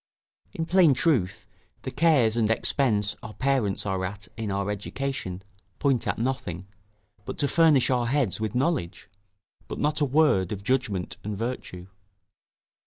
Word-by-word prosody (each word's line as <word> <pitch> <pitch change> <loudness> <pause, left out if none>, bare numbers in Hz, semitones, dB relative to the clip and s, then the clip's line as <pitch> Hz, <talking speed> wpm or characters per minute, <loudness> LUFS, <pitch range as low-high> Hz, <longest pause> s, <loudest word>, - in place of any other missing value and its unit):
In 160 - -3
plain 170 -5 +5
truth, 125 - +1 0.4
the 130 - -4
cares 140 -6 +3
and 110 -2 +1
expense 110 -3 +1
our 110 - -9
parents 130 -9 0
are 95 -2 -1
at 100 +2 -5
in 110 -2 -4
our 100 +1 -1
education, 105 -3 -4 0.3
point 135 -5 +1
at - - -1
nothing, 110 -8 -3 0.6
but - - -6
to 145 - +1
furnish 150 -3 +4
our 120 -2 +1
heads 130 -6 0
with 110 +1 -2
knowledge; 125 - -1 0.6
but - - -6
not 150 +1 0
a - - +4
word 140 - +3
of 100 -2 -5
judgment 105 -7 -1
and 105 -1 -4
virtue. 110 -6 -5
120 Hz, 150 wpm, -26 LUFS, 100-140 Hz, 0.6 s, plain